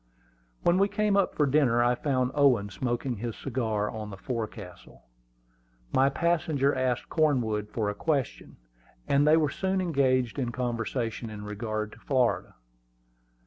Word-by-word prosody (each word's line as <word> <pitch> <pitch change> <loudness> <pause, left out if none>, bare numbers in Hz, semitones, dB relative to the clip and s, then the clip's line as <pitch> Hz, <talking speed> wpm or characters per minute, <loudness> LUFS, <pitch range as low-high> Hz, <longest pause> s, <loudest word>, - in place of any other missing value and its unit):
When 175 +2 +3
we 200 - +4
came 210 -1 +1
up 200 -1 +2
from 145 -3 +2
dinner 125 -5 +3
I 120 0 +3
found 130 -1 0
Owen 125 -8 +3
smoking 120 +3 -2
his 115 +1 -4
cigar 110 -5 -2
on 110 -1 -6
the 100 - -8
forecastle. 110 -4 -7 0.9
My 135 +1 +4
passenger 155 -3 +1
asked 130 -2 -1
Cornwood 120 -10 +1
a 105 -2 0
question, 140 +3 -2 0.5
and 140 +1 +3
they 155 +1 +6
were 150 -3 +1
soon 190 0 -1
engaged 135 -7 +1
in 125 -3 -1
conversation 120 -1 -3
in 105 -1 -8
regard 105 0 -4
to 105 - -14
Florida. 130 -1 0
125 Hz, 145 wpm, -28 LUFS, 110-145 Hz, 0.9 s, they